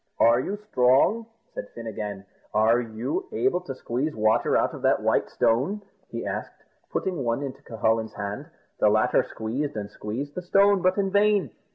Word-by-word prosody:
"Are 115 Hz, +1 st, +5 dB
you 195 Hz, +10 st, -3 dB
strong?" 205 Hz, -, +3 dB, 0.3 s
said -, -, -6 dB
Fin 115 Hz, -, -7 dB
again; 105 Hz, -3 st, -5 dB, 0.3 s
"are 110 Hz, +3 st, +4 dB
you 120 Hz, -, -3 dB
able 180 Hz, -2 st, +1 dB
to 135 Hz, -7 st, -6 dB
squeeze 130 Hz, +5 st, -2 dB
water 110 Hz, 0 st, +3 dB
out -, -, +1 dB
of -, -, -8 dB
that -, -, +2 dB
white -, -, +2 dB
stone?" 140 Hz, -, +1 dB, 0.3 s
he -, -, -5 dB
asked, -, -, -5 dB, 0.3 s
putting 180 Hz, -7 st, -2 dB
one 120 Hz, +3 st, -1 dB
into 135 Hz, -2 st, -6 dB
Cucullin's 110 Hz, 0 st, -1 dB
hand. 105 Hz, +8 st, -5 dB, 0.3 s
The 105 Hz, -, +5 dB
latter 110 Hz, +4 st, +3 dB
squeezed 125 Hz, +4 st, -4 dB
and 100 Hz, -1 st, -5 dB
squeezed 130 Hz, +8 st, -5 dB
the 180 Hz, -, -4 dB
stone, 200 Hz, +2 st, +4 dB
but 185 Hz, +2 st, +2 dB
in 195 Hz, -1 st, +1 dB
vain. 205 Hz, -, +3 dB
130 Hz, 175 wpm, -26 LUFS, 110-185 Hz, 0.3 s, Are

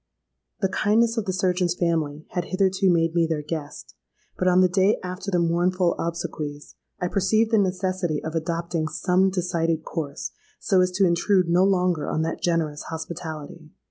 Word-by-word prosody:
The 195 Hz, -, +3 dB
kindness 225 Hz, +4 st, +2 dB
of 220 Hz, -, 0 dB
the 190 Hz, -, -1 dB
surgeon's 180 Hz, -1 st, +1 dB
family 160 Hz, -4 st, -1 dB
had 175 Hz, -1 st, -2 dB
hitherto 190 Hz, 0 st, +2 dB
made 165 Hz, -1 st, +2 dB
me 170 Hz, -1 st, +2 dB
their 155 Hz, -2 st, -2 dB
guest; 150 Hz, -1 st, -6 dB, 0.4 s
but 185 Hz, -, -1 dB
on 180 Hz, 0 st, +5 dB
the 185 Hz, -, +6 dB
day 190 Hz, +3 st, +2 dB
after 185 Hz, +2 st, -5 dB
the 180 Hz, -, +1 dB
mournful 175 Hz, +1 st, +2 dB
obsequies, 155 Hz, -3 st, -4 dB, 0.3 s
I 180 Hz, -, -1 dB
perceived 215 Hz, +4 st, +1 dB
the 220 Hz, -, +4 dB
necessity 185 Hz, -4 st, 0 dB
of 160 Hz, -, -4 dB
adopting 170 Hz, 0 st, -2 dB
some 185 Hz, +4 st, +2 dB
decided 165 Hz, -3 st, -1 dB
course, 145 Hz, -4 st, -5 dB, 0.3 s
so 190 Hz, -2 st, +3 dB
as 180 Hz, -, +3 dB
to 195 Hz, +1 st, +3 dB
intrude 180 Hz, +1 st, +2 dB
no 175 Hz, +2 st, +4 dB
longer 180 Hz, -4 st, +1 dB
on 160 Hz, -, 0 dB
that 165 Hz, -, -3 dB
generous 160 Hz, -4 st, 0 dB
hospitality. 160 Hz, 0 st, -7 dB
175 Hz, 170 wpm, -24 LUFS, 165-185 Hz, 0.4 s, the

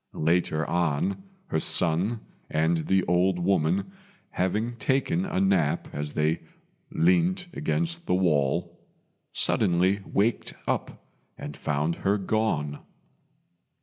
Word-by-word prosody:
Later 80 Hz, -1 st, +1 dB
on, 85 Hz, -, 0 dB, 0.3 s
her -, -, +1 dB
son 90 Hz, +9 st, +1 dB, 0.3 s
and 80 Hz, 0 st, +1 dB
the 95 Hz, -1 st, +3 dB
old 90 Hz, +2 st, +2 dB
woman 90 Hz, -, +1 dB, 0.4 s
having 105 Hz, +6 st, -1 dB
taken 140 Hz, -, 0 dB
a -, -, -1 dB
nap 95 Hz, -6 st, +1 dB
as 75 Hz, 0 st, -4 dB
they 75 Hz, +2 st, +1 dB, 0.5 s
leant 175 Hz, +2 st, +2 dB
against 170 Hz, +2 st, -2 dB
the -, -, +2 dB
wall, 85 Hz, 0 st, +1 dB, 0.5 s
suddenly 95 Hz, 0 st, +3 dB
waked 110 Hz, +4 st, 0 dB
up -, -, -3 dB, 0.3 s
and 75 Hz, -, -7 dB
found 75 Hz, +2 st, -1 dB
her 100 Hz, +2 st, +1 dB
gone. 95 Hz, -8 st, -1 dB
90 Hz, 110 wpm, -26 LUFS, 80-110 Hz, 0.5 s, the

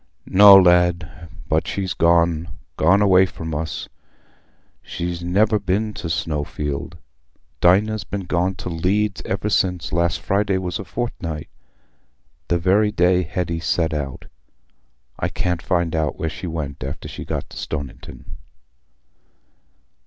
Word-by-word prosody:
"No, 100 Hz, +1 st, +8 dB
lad; 90 Hz, -3 st, +3 dB, 0.2 s
but -, -, 0 dB
she's 95 Hz, -4 st, -2 dB
gone—gone 85 Hz, +2 st, +2 dB
away 95 Hz, -1 st, +5 dB
from 80 Hz, -3 st, -7 dB
us. 80 Hz, +2 st, -4 dB, 0.9 s
She's 85 Hz, 0 st, -5 dB
never 105 Hz, +5 st, +2 dB
been 105 Hz, +3 st, -1 dB
to 85 Hz, -, -6 dB
Snowfield. 75 Hz, +1 st, -3 dB, 0.6 s
Dinah's 105 Hz, +5 st, +3 dB
been 100 Hz, -2 st, -5 dB
gone 90 Hz, +1 st, 0 dB
to 90 Hz, -, -6 dB
Leeds 95 Hz, +5 st, 0 dB
ever 95 Hz, +2 st, -2 dB
since 90 Hz, -4 st, 0 dB
last 85 Hz, -2 st, +1 dB
Friday 100 Hz, 0 st, 0 dB
was 90 Hz, -2 st, -3 dB
a 100 Hz, -, -6 dB
fortnight, 85 Hz, -10 st, -5 dB, 1.0 s
the 85 Hz, -, +1 dB
very 100 Hz, +5 st, +2 dB
day 90 Hz, -2 st, +3 dB
Hetty 85 Hz, -1 st, -3 dB
set 80 Hz, -1 st, 0 dB
out. 70 Hz, -4 st, -4 dB, 0.9 s
I -, -, -1 dB
can't 90 Hz, -2 st, -2 dB
find 85 Hz, -4 st, 0 dB
out 80 Hz, -2 st, -1 dB
where 80 Hz, -, -2 dB
she 90 Hz, -, -7 dB
went 75 Hz, -6 st, -5 dB
after 70 Hz, -, -6 dB
she -, -, -7 dB
got -, -, -4 dB
to -, -, -10 dB
Stoniton." 70 Hz, -4 st, -7 dB
90 Hz, 130 wpm, -21 LUFS, 80-95 Hz, 1.0 s, No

